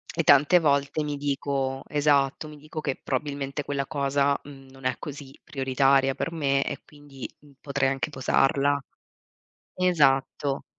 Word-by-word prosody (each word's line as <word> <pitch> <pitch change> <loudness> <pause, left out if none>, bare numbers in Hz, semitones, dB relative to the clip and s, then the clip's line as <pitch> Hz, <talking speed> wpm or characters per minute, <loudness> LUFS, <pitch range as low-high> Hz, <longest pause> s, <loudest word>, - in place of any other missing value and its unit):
E 165 - +1
tante 145 +5 +6
volte 140 0 +1
mi 145 -1 -3
dico 140 -1 -2
esatto, 145 0 +1
mi 150 -1 -11
dico 155 +1 -7
che 135 -3 -2
probabilmente 140 +1 -3
quella 140 -1 -2
cosa, 140 -1 +1
mhmm, 135 -2 -13
non 135 -1 -14
è 130 -2 +1
così 140 -2 -9
prioritaria 135 0 +2
per 165 - -3
me, 140 -4 +1
e - - -4
quindi 145 -3 -10 0.3
potrei 140 -1 0
anche 135 +3 -2
posarla 140 +1 +2 1.0
Esatto. 140 -5 +1
140 Hz, 140 wpm, -26 LUFS, 135-145 Hz, 1.0 s, tante